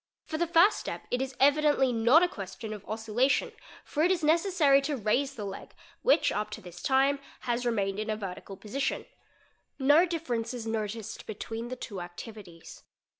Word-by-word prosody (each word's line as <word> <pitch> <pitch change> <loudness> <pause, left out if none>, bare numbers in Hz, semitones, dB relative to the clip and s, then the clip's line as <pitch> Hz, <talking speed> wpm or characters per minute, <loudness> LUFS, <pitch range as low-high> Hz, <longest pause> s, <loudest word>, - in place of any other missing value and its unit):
For 315 - -4
the 345 - +1
first 340 +5 +5
step - - -6
it 250 - 0
is 265 -1 -4
— - - -31
evidently 285 -2 +4
not 235 +9 +5
a - - +4
question 215 - -7
of 210 -2 -9
oscillation 225 +5 +1 0.3
for 300 - -2
it 340 - +4
is 365 -3 +1
necessary 315 -3 +4
to 285 0 -2
raise 260 +6 0
the 210 -4 -5
leg, 195 -1 -8
— - - -28
which - - +4
up 210 +1 -2
to - - -11
this 175 -1 -11
time 275 +1 +3 0.2
has 245 0 -1
remained 200 -3 0
in 215 +1 -3
a 215 - -1
vertical 195 -1 -7
position. 255 +8 -3 0.7
No 290 +6 +5
differ 330 -7 -3
i - - +2
ence 230 +2 -4
is 235 -2 -6
noticed 220 -1 -4
between 225 +2 -5
the 255 - -5
two 200 -6 -7
activities. 175 -1 -10
245 Hz, 195 wpm, -29 LUFS, 215-290 Hz, 0.7 s, first